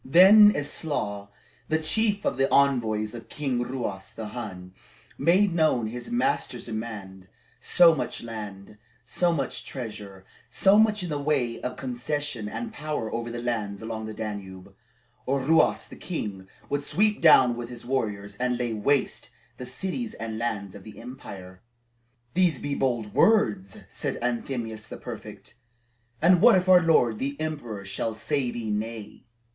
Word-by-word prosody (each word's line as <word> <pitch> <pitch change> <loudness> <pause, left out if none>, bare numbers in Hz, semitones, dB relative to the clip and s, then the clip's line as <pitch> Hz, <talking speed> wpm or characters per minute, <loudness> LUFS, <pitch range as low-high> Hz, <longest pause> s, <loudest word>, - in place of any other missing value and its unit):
Then 200 +8 +8
Eslaw, 140 -8 -3 0.4
the 160 - +3
chief 205 +6 0
of - - 0
the 135 0 +2
envoys 115 -6 +2
of 115 -1 -9
King 135 -5 -2
Ruas 120 -6 -4
the 110 -2 -6
Hun, 95 -6 -7 0.4
made 185 +2 +3
known 155 -8 +2
his 120 - -6
master's 240 - -1
demands 105 -5 -6 0.3
So 170 -2 +6
much 145 - -4
land, 105 -3 -8 0.3
so 170 +8 +1
much 140 -6 -3
treasure, 105 -6 -8 0.2
so 195 - +4
much 215 -2 +3
in 175 - -4
the 145 - -1
way 135 -6 0
of 125 0 -4
concession 130 -2 -3
and 225 - -5
power 145 - -4
over 115 0 -3
the 120 0 -5
lands 110 -4 -3
along 110 -1 -5
the 110 - -6
Danube, 100 -3 -7 0.5
or 135 +1 +1
Ruas 160 +4 +3
the - - -11
king 100 - -5 0.2
would 145 0 -2
sweep 210 +2 +2
down 130 -7 +7
with 120 0 -6
his 120 -1 -9
warriors, 105 -6 -2
and 125 -1 0
lay 120 -2 -2
waste 135 +6 0 0.3
the 125 - -7
cities 190 - -3
and 110 -1 -5
lands 105 -5 -3
of 100 - -11
the 110 - -11
empire. 95 -7 -10 0.7
"These 180 -3 +3
be 145 - -3
bold 120 -6 -1
words," 105 - +2
said - - -4
Anthemius 115 -3 -3
the - - -8
prefect. - - -9 0.7
"And 180 0 +6
what 240 -1 +8
if 185 0 +1
our 185 -1 +7
lord 125 -9 +3
the 140 +2 -3
emperor 130 -11 -4
shall 110 +3 -3
say 135 +2 -1
thee 115 -3 -4
nay?" 110 +1 -5
120 Hz, 155 wpm, -26 LUFS, 110-155 Hz, 0.7 s, Then